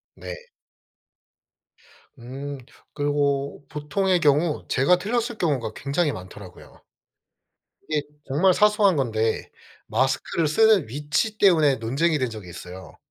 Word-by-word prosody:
네. - - -8 1.8
음. 135 +4 -7 0.4
그리고 145 -1 -1
보통의 180 +5 0
경우 150 0 +2
제가 140 +8 +3
틀렸을 230 +4 -2
경우가 130 -10 -1
굉장히 145 +3 0
많더라고요. 95 -1 -12 1.1
이게 150 -1 +1 0.3
정말 175 +7 +3
사소한 210 -2 +4
건데 110 -5 -1 0.4
마스크를 130 +7 0
쓰는 210 - +4
위치 150 - -2
때문에 160 -8 +4
논쟁이 145 +8 0
된 130 -2 0
적이 105 -6 -9
있어요. 90 +1 -10
145 Hz, 250 characters per minute, -24 LUFS, 125-175 Hz, 1.8 s, 사소한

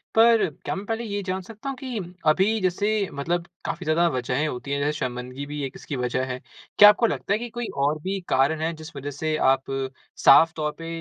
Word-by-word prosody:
पर 230 0 +6 0.2
क्या - - -2
मैं 195 +2 -6
पहले 225 +2 -2
ये 205 -2 -3
जान 190 0 -2
सकता 215 +7 -8
हूँ 275 - -3
कि 255 -4 -4 0.3
अभी 200 +8 +3
जैसे 200 +2 0
मतलब 170 +5 -2 0.2
काफ़ी 170 +2 -4
ज़्यादा 160 +3 +3
वजहें 130 +2 -1
होती 125 0 -5
हैं, 140 - 0
जैसे 145 +1 +1
शर्मिंदगी 125 +2 -4
भी 145 +1 -5
एक 130 - -6
इसकी 145 - -6
वजह 125 0 -1
है। 125 - -5 0.4
क्या 205 - +11
आपको 230 +3 +3
लगता 200 - -1
है 210 - +1
कि 240 0 -5
कोई 240 0 -4 0.2
और 150 +2 +1
भी 195 +4 -2
कारण 140 +4 +2
हैं, 165 +1 0
जिस 155 0 -11
वजह 140 +1 -5
से 155 +2 -2 0.2
आप 135 0 +1 0.6
साफ़ 160 +4 +8
तौर 150 -1 -1
पे 165 0 -8
160 Hz, 225 wpm, -24 LUFS, 140-205 Hz, 0.6 s, क्या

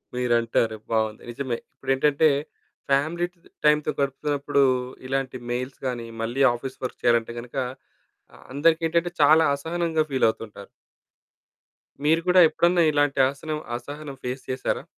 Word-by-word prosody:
మీరంటారు 115 -2 +1
బావుంది. 110 -1 0
నిజమే. 125 -1 -3 0.2
ఇప్పుడేంటంటే, 140 +3 +2 0.6
ఫ్యామిలీ 160 +6 +2 0.4
టైంతో 150 0 +4
గడుపుతున్నప్పుడు 140 +1 0 0.4
ఇలాంటి 135 -1 -2
మెయిల్స్ 125 +2 -4
గానీ, 120 -2 -4 0.2
మళ్ళీ 125 +4 0
ఆఫీస్ 130 +2 -7
వర్క్ - - -6
చేయాలంటే 115 -1 +2
గనుక, 120 +3 -9 0.8
ఆ! - - -15 0.2
అందరికేటంటే 165 +3 +2
చాలా 155 +2 +6
అసహనంగా 165 +1 -1
ఫీలవుతుంటారు. 110 -5 -1 1.4
మీరు 160 +2 +4
కూడా 180 0 +6
ఎప్పుడన్నా 170 +2 +3
ఇలాంటి 145 -1 +1
అసనం 155 +2 -5 0.2
అసహనం 145 +2 -7
ఫేస్ 125 +1 -4
చేశారా? 130 0 -2
140 Hz, 110 wpm, -24 LUFS, 125-155 Hz, 1.4 s, చాలా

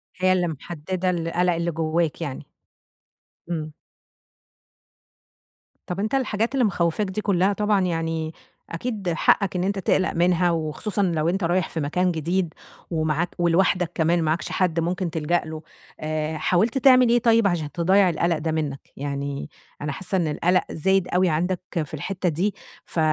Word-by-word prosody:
هي 185 0 +3
اللي 180 -1 +1
محددة 175 +4 -3
القلق 175 +1 +1
اللي 170 +1 -1
جواك 160 +1 -1
يعني. 140 -5 -5 1.0
امم. 155 -3 -3 2.1
طب، 180 +2 -4
أنتَ 220 +6 0
الحاجات 230 -2 0
اللي 255 -4 +3
مخوفاك 175 +1 0
دي 190 +3 -3
كلها 195 0 +2
طبعًا 210 -1 +1
يعني، 165 -2 -2 0.4
أكيد 200 +1 -3
حقك 190 +3 +2
إن 180 - 0
أنتَ 200 0 -1
تقلق 185 0 +1
منها، 175 0 +3
وخصوصًا 165 +6 -2
لو 165 -3 +1
أنتَ 190 +1 -1
رايح 175 0 +1
في 165 - -4
مكان 180 +5 +1
جديد 170 +2 -1 0.4
ومعاك 160 +1 0
ولوحدك 175 0 +2
كمان 170 +1 +2
معاكش 155 +1 -1
حد 170 -3 +1
ممكن 175 +1 -1
تلجأ 165 +2 0
له. 155 0 -6 0.4
آآ، 155 0 -2
حاولت 215 - +1
تعمل 255 -2 +6
إيه 240 +1 +4
طيب، 230 -2 +4
عشان 160 -5 -1
تضيع 185 +4 +3
القلق 170 0 +1
ده 160 +1 -2
منك؟ 150 -3 -2 0.2
يعني 140 +1 -4 0.3
أنا 150 0 -2
حاسة 185 +5 -4
إن 170 -3 +1
القلق 180 +4 +2
زايد 190 +3 +1
أوي 180 0 +2
عندك 175 +4 0 0.2
في 145 - -17
الحتة 180 +4 -2
دي، 185 +7 0 0.3
ف 165 - -4
175 Hz, 155 wpm, -24 LUFS, 160-190 Hz, 2.1 s, تعمل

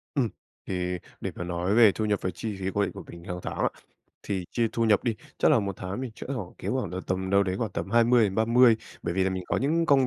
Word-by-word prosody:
Ừm. 125 -6 +2 0.4
Thì 90 -1 -1 0.2
để - - -2
mà 90 - -4
nói 90 +3 -1
về 115 -4 +8
thu 110 - -2
nhập 105 -2 +1
và 95 - -1
chi 105 +3 -4
phí 95 - -4
cố 100 - +1
định - - 0
của - - -9
mình 85 0 -10
hàng 90 0 -5
tháng - - -4
á, - - +2 0.6
thì 95 -3 -2
chia 115 -2 +1
thu 115 - +1
nhập 105 -3 +3
đi, 115 -3 +1 0.2
chắc - - +4
là 130 -7 +5
1 100 -2 -3
tháng 95 +7 -5
mình 130 -3 -4
chẽ - - -8
hoảng 95 -8 -5
kiếm - - -3
hoảng 130 -9 -2
là 95 - -2
tầm 95 0 -1
đâu 100 0 +5
đấy 95 -1 -1
khoảng 115 0 -2
tầm 95 - -4
20 120 0 +5
đến 95 -2 -1
30 115 +1 +5 0.3
bởi 85 - -2
vì 95 0 +2
là 95 - +1
mình 95 -1 -3
có - - 0
những 165 +5 +1
công 135 -2 +5
105 Hz, 285 wpm, -27 LUFS, 95-120 Hz, 0.6 s, về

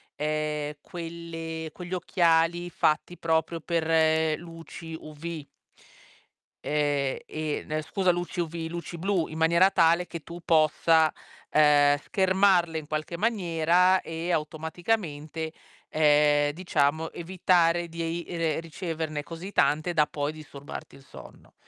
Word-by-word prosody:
ehm, 150 0 -2
quelle 165 -2 -6
quegli 180 +2 -8
occhiali 175 -1 +2
fatti 155 +3 0
proprio 160 0 0
per 160 -1 +2
luci 165 -1 -9
UV. 155 0 -7 1.2
Ehm, 145 -2 0
e 155 -1 -3
ne 155 0 -2
scusa, 185 +4 +1
luci 175 0 -4
UV, 165 -1 -3
luci 170 +1 -6
blu, 180 -1 0
in 155 - -8
maniera 170 +4 +5
tale 170 -1 +3
che 170 -3 -7
tu 170 +3 -9
possa, 160 0 +4 0.4
uhm, 145 -1 +5
schermarle 190 -1 +2
in 155 -2 -6
qualche 155 +2 -3
maniera, 180 -3 +3
e 165 +2 -4
automaticamente, 160 0 -2 0.4
ehm, 150 -1 +4
diciamo 160 -2 0
evitare 175 -1 +1
di 165 +1 -6
ei 165 +1 -2
re 160 -2 0
riceverne 160 -2 -4
così 170 +5 -8
tante 155 +1 +2
da 150 -2 +3
poi 145 0 -2
disturbarti 145 -2 -10
il 135 - -16
sonno. - - -14
165 Hz, 120 wpm, -27 LUFS, 155-170 Hz, 1.2 s, maniera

